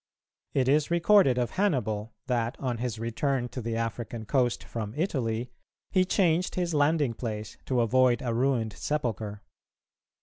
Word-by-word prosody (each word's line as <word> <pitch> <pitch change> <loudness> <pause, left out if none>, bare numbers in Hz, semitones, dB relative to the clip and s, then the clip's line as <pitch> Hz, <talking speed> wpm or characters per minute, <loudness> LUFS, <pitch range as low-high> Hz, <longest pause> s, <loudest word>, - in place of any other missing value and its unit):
It 130 -2 +2
is 145 +2 +3
recorded 170 -5 +5
of 120 -1 0
Hannibal 120 - 0
that, 120 -2 -1
on 125 -4 -2
his 120 -2 -2
return 120 +3 -1
to 125 - -5
the 115 0 -3
African 115 0 -3
coast 125 0 +1
from 110 -1 -5
Italy, 125 - -1 0.4
he 185 -1 +3
changed 180 -2 +2
his 175 -2 -1
landing 145 -3 +2
place 110 -2 -5
to 125 -2 +2
avoid 125 +1 +3
a 120 -2 -1
ruined 120 -3 +1
sepulchre. 110 -6 -3
125 Hz, 145 wpm, -28 LUFS, 115-145 Hz, 0.4 s, recorded